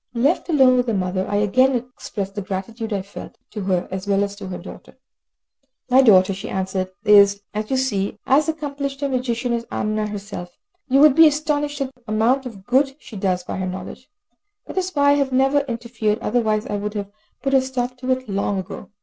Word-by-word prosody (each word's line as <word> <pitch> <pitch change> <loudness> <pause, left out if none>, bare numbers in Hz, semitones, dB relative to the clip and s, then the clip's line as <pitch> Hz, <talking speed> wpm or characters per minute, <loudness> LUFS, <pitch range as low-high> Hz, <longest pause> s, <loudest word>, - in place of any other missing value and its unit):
Left 280 +10 +1
alone 265 -5 +5
with 250 0 +1
the 225 - 0
mother, 185 0 -1
I 205 - -1
again 255 +6 +3
expressed 235 -5 -5
the 205 - -4
gratitude 220 +4 -5
I 200 -2 -1
felt, 200 - -10
to 210 - -5
her 185 -2 0
as 190 +1 -5
well 200 0 +2
as 200 0 -4
to 200 -2 -7
her 185 - -5
daughter. - - -12 0.9
"My 260 +2 +7
daughter," 195 -6 +5
she 190 - -7
answered, 190 0 -2 0.2
"is, 200 -1 +6
as 215 +1 -3
you 265 - +1
see, 205 -7 -1
as 295 +4 +3
accomplished 280 -3 -4
a - - +2
magician 245 -1 -1
as 235 0 -3
Amina 215 0 -1
herself, 200 -4 -7 0.3
but 265 - -1
you 275 - +6
would 300 -2 +8
be 325 +2 +8
astonished 295 -1 -1
at 270 -1 -3
the 250 - -30
amount 235 +5 +1
of 200 -5 -11
good 270 +3 +2
she 240 - -13
does 185 -2 -1
by - - -5
her 185 -1 -2
knowledge. 190 +7 -7 0.6
That - - -3
is 370 0 -2
why 285 -5 +3
I - - +5
have 275 -2 0
never 270 +2 +3
interfered, 235 -5 -2
otherwise 215 -2 0
I 205 - -3
should 210 +1 -4
have 200 -1 -4 0.3
put 275 0 0
a 265 - +6
stop 255 -1 -3
to 255 0 -6
it 255 0 0
long 200 0 -1
ago." 190 - -7
230 Hz, 215 wpm, -21 LUFS, 200-265 Hz, 0.9 s, would